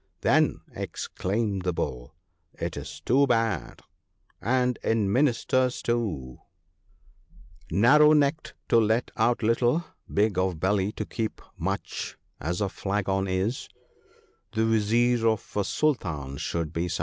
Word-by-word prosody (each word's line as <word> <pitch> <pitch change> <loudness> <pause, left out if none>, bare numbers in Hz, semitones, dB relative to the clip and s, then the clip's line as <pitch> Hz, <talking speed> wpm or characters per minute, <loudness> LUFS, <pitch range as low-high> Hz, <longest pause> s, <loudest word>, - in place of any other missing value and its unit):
' - - -47
Then,' - - +3
exclaimed 100 0 -3
the 90 -1 -1
Bull, 65 -1 -4 0.4
'it - - -4
is - - -7
too 140 +4 +3
bad: 115 - 0 0.6
and 125 +2 +1
in 105 -3 +1
Ministers 130 -1 +2
too! 95 - -2 0.4
— - - -35
" 85 -1 -25
Narrow 145 - +6
necked 150 +1 +1
to 115 - +6
let 110 +2 +1
out 120 +1 +1
little, 120 +8 +2 0.3
big 100 -2 +2
of 95 -3 0
belly 95 +2 +1
to - - -4
keep 110 -2 -4 0.2
much 95 +4 -4 0.2
As 90 +5 -2
a 100 - +2
flagon 95 0 -1
is 95 +6 -1 0.4
— - - -34
the 110 0 +1
Vizier 115 +2 +2
of 110 -2 -1
a 105 - +2
Sultan 75 - -1
should 85 +2 -3
be 85 +2 -1
such." - - -2
110 Hz, 140 wpm, -27 LUFS, 95-120 Hz, 0.6 s, Narrow